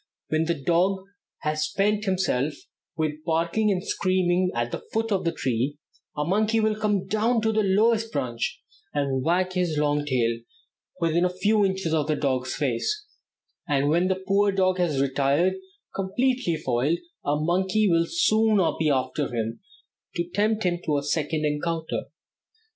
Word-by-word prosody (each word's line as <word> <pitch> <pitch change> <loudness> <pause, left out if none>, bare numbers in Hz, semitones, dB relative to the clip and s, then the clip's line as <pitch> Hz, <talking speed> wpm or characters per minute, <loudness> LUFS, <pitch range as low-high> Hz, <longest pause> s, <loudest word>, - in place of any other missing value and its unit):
When 155 +1 +1
the 170 +1 0
dog 175 +6 +1 0.4
has 155 0 0
spent 205 +6 0
himself 155 -7 0 0.4
with 155 -1 -2
barking 170 +7 +1
and 190 -1 0
screaming 185 -1 +1
at 120 0 -1
the - - -4
foot 225 0 -1
of 195 -3 0
the 170 - +2
tree, 130 0 -1 0.4
a 150 - 0
monkey 215 +5 +2
will 215 -1 +2
come 210 -3 0
down 220 +4 +1
to 220 - +2
the 215 0 +2
lowest 220 +3 +2
branch, 125 - -2 0.4
and 135 -2 0
wag 185 +3 +1
his 175 -4 0
long 145 0 +1
tail 115 -4 +1 0.6
within 165 0 +2
a 180 - +3
few 205 +4 +2
inches 190 -4 0
of 155 -2 +1
the 155 - +1
dog's 130 -3 -1
face, 145 - -1 0.6
and 145 -2 +2
when 170 +4 +3
the 190 0 -1
poor 200 +1 +3
dog 185 -1 +1
has 160 -6 +1
retired, 140 +6 +2 0.4
completely 220 0 0
foiled, 140 +2 0 0.3
a 145 - +1
monkey 190 +6 +2
will 170 -2 +3
soon 220 - +3 0.2
be 155 -1 +2
after 130 +1 0
him 115 -1 -3 0.6
to 170 -1 -1
tempt 215 +1 +1
him 175 -2 0
to 150 -2 +1
a 140 - -2
second 155 +1 -1
encounter. 160 +2 -2
170 Hz, 160 wpm, -25 LUFS, 145-195 Hz, 0.6 s, a